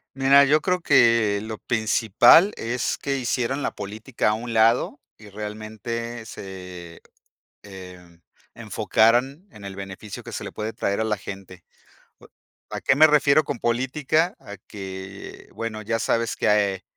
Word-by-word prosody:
Mira, 135 +1 +6
yo 145 +2 +4
creo 180 +2 -1
que 115 -8 +4
lo 110 0 -6
principal 120 - +4
es 120 +1 -2
que, 140 -1 -2
hicieran 130 +2 -1
la - - -1
política 105 +3 -3
a - - 0
un 115 +2 -5
lado 115 +5 +2 0.2
y 110 -1 -14
realmente 110 +3 -6
se, 90 -4 -10 0.6
em, 90 -3 -13 0.3
enfocaran 125 - +1
en 100 -2 -12
el 95 -1 -8
beneficio 100 +1 -8
que - - -10
se - - -5
le - - -6
puede 110 +1 -5
traer 100 -2 -2
a - - +1
la 105 -2 -1
gente. 95 -2 -10 0.6
O - - -17 0.4
¿A - - -5
qué 130 - +3
me 155 +2 +7
refiero 150 0 +4
con 140 - -4
política? 130 +8 0
A 100 - -11
que 95 -1 -9
bueno, 115 -1 -5
ya 115 +2 -1
sabes 115 0 -1
que 100 -2 +1
110 Hz, 150 wpm, -23 LUFS, 100-125 Hz, 0.6 s, me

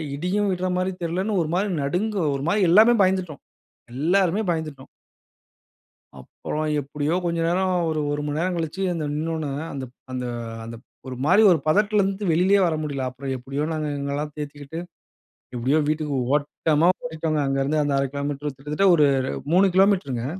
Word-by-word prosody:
இடியும் 195 +6 0
விடுற 185 0 -1
மாதிரி 185 +1 0
தெரியலன்னு 185 +5 -1
ஒரு 155 - -2
மாரி 200 +3 0
நடுங்கு 200 +9 -1 0.2
ஒரு 140 - -4
மாரி 210 - +2
எல்லாமே 220 +7 +7
பயந்துட்டோம். 185 -6 -1 0.5
எல்லாருமே 180 - +2
பயந்துட்டோம். 155 -5 -4 1.3
அப்புறம் 155 - -5
எப்படியோ 150 +4 -2
கொஞ்சம் 170 -1 0
நேரம் 185 +1 +1 0.2
ஒரு 155 -1 -1
1 145 0 -2
மணி 150 +1 -2
நேரம் 180 +1 0
கழிச்சு 165 +3 -3
அந்த 160 -3 -3
நின்னோனே, 160 -1 -2 0.2
அந்த 135 -2 -5 0.3
அந்த 125 -1 -3 0.4
அந்த 115 - -7 0.3
ஒரு 130 - -5
மாரி 185 +7 +5
ஒரு 165 - +3
பதட்டத்திலேருந்து 200 +2 +2
வெளிலயே 190 +5 +4
வர 165 - 0
முடியல. 140 -3 -3
அப்புறம் 135 +1 -5
எப்படியோ 135 +4 -4
நாங்க 155 -1 -2
எங்களையெல்லாம் 145 +1 -3
தேத்திக்கிட்டு, 145 +1 -6 0.8
எப்படியோ 130 +6 +1
வீட்டுக்கு 150 -2 -1 0.2
ஓட்டமா 150 +2 +1 0.2
ஓடிட்டோங்க. 160 -1 -2
அங்கேருந்து 135 +3 0
அந்த 145 -1 0
1/2 135 0 +1
கிலோமீட்டர் 140 0 -3
கிட்டத்தட்ட 150 +8 0
ஒரு 150 -3 +5 0.5
3 190 +2 +6
கிலோமீட்டருங்க. 180 - +2
155 Hz, 150 wpm, -23 LUFS, 145-185 Hz, 1.3 s, எல்லாமே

